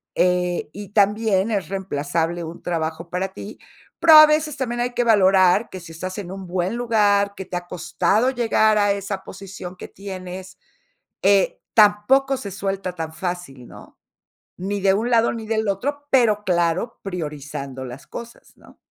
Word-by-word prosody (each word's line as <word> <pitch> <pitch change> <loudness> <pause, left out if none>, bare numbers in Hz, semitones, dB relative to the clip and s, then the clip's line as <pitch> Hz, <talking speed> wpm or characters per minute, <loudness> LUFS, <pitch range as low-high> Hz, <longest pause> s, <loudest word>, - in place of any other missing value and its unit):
Eh, 180 -2 +1
y 205 -1 -9
también 205 0 +2
es 200 -4 -1
reemplazable 170 -2 -2
un 165 +1 -9
trabajo 165 0 -3
para 185 +2 -2
ti, 205 +3 -9 0.4
pero 335 -1 +6
a 310 0 +12
veces 305 -1 +1
también 240 -2 -3
hay 245 +1 -1
que 245 - +1
valorar 195 -2 +4
que 185 - -8
si 165 - -11
estás 185 +3 -6
en 185 -3 -7
un 190 -1 -8
buen 180 +4 -1
lugar, 205 -4 +2
que 190 - -6
te 180 - -4
ha 175 0 -7
costado 205 +7 +1
llegar 225 -4 +2
a 205 -1 +3
esa 195 -1 -5
posición 190 -2 -9
que - - -9
tienes, 185 -1 -8 0.7
eh, 195 -1 +3 0.2
tampoco 235 +6 +4
se 205 -6 -7
suelta 195 -1 -3
tan 160 -2 -6
fácil, 175 -8 -6
¿no? - - -15 0.6
Ni 200 +3 -3
de 195 0 +3
un 225 +5 0
lado, 235 -1 +3
ni 225 -2 -6
del 220 -1 0
otro, 285 +9 -2
pero 220 -6 +3
claro, 175 +5 0
priorizando 150 -7 -6
las 125 +3 -10
cosas, 235 0 -10
¿no? - - -20
195 Hz, 170 wpm, -22 LUFS, 180-220 Hz, 0.7 s, a